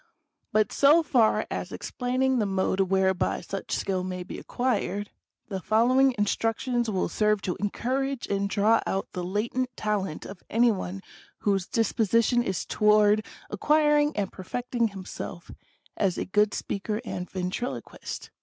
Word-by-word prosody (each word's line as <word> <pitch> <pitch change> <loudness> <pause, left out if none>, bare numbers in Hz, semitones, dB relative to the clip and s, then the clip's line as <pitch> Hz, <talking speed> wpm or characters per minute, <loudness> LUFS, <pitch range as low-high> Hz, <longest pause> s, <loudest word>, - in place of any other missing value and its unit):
" 310 - -56
But 215 -1 +2
so 300 +4 +5
far 240 -7 +3
as - - -4
explaining 255 +1 0
the 210 - +1
mode 190 0 0
whereby 190 -1 +2
such 195 - -6
skill 185 -2 -1
may 180 -1 -4
be 180 - -7
acquired, 205 -5 -2 0.4
the 195 -3 -4
following 250 +7 +3
instructions 225 +3 0
will 190 -3 0
serve 210 -2 +1
to 180 - -1
encourage 260 +6 -2
and 200 0 -1
draw 215 +3 +3
out 195 - -2
the 180 - -4
latent 225 +7 -1
talent 200 -6 -2
of 195 -2 -9
any 235 +1 +4
one 190 -1 -5 0.4
whose 195 -3 +1
disposition 230 +2 +2
is 190 -6 -2
toward 210 0 +4 0.3
acquiring 295 -2 +3
and 200 -2 -1
perfecting 240 +4 -2
him 195 -3 -9
self 175 - -7 0.4
as 190 -4 0
a - - -2
good 210 +2 +2
speaker 210 +2 -3
and 180 -4 -5
ventriloquist. 185 +6 -5
210 Hz, 145 wpm, -27 LUFS, 195-245 Hz, 0.4 s, so